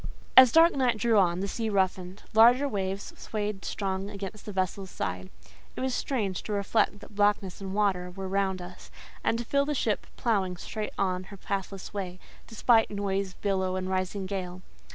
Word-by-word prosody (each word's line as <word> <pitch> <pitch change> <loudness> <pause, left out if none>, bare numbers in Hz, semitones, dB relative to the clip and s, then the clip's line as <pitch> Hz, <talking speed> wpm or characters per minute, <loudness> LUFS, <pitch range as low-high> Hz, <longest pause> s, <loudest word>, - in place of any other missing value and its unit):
As 260 -2 +10
dark 330 +3 +6
night 250 -4 +2
drew 220 0 +3
on, 175 -1 +2
the 200 - -1
sea 225 +2 -2
roughened: 190 -1 -1
larger 240 +6 +6
waves 195 -4 -3
swayed 210 -2 -4
strong 195 0 -3
against 200 +1 -7
the - - -3
vessel's 190 0 -2
side. 90 - -4 0.5
It - - -5
was 260 0 0
strange 210 -9 -1
to 215 - -5
reflect 205 0 +1
that - - -13
blackness 205 -2 +1
and 190 -1 -5
water 190 -4 +1
were 190 +1 -6
round 190 -1 0
us, 180 +1 -11 0.3
and 230 - +2
to 235 - -4
feel 280 +3 +2
the 295 0 -1
ship 220 -5 -1
ploughing 195 -6 0
straight 215 +4 -5
on 185 -1 0
her 200 0 -11
pathless 195 0 -4
way, 185 -3 -4 0.3
despite 225 0 +3
noise, 195 -2 -2
billow, 190 -2 0
and 185 0 -3
rising 185 +1 -1
gale. 185 -1 -5
200 Hz, 180 wpm, -28 LUFS, 185-215 Hz, 0.5 s, As